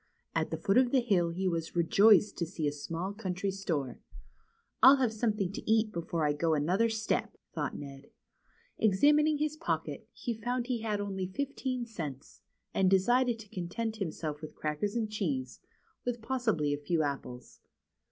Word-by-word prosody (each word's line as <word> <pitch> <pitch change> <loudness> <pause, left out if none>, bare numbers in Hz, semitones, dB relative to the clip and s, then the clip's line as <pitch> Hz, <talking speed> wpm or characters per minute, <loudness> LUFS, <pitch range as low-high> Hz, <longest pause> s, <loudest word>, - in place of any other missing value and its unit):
At - - 0
the - - -3
foot 195 +5 +3
of 255 -1 +3
the 265 - +4
hill 195 -8 +2
he 185 +3 -2
was 165 -2 -2
rejoiced 205 +5 +5
to 170 - 0
see 160 -3 -2
a - - +1
small 165 +6 -4
country 195 -2 -2
store. 165 -10 -3 0.8
I'll 265 +2 +10
have 255 -5 +1
something 210 -4 0
to 210 - -3
eat 220 -1 +3
before 170 -3 -2
I 145 - +2
go 160 +2 +1
another 185 +10 +2
step," 220 -1 -1 0.2
thought - - -3
Ned. 140 -1 -9 0.7
Examining 295 +9 +4
his 305 +1 -1
pocket, 330 - -3
he 240 - -4
found 240 +2 -2
he 245 -3 -2
had 215 -2 -1
only 195 -2 -3
fifteen 255 +3 -3
cents, 155 - -7 0.3
and 190 -1 +3
decided 240 +6 +3
to 220 -2 -12
content 220 +6 -3
himself 155 -6 -4
with 155 - -8
crackers 155 +8 -2
and 230 -2 0
cheese, 150 - -3 0.4
with 245 -1 -2
possibly 220 - 0
a 145 - -3
few 160 +1 +1
apples. 130 -4 -5
195 Hz, 170 wpm, -31 LUFS, 165-230 Hz, 0.8 s, I'll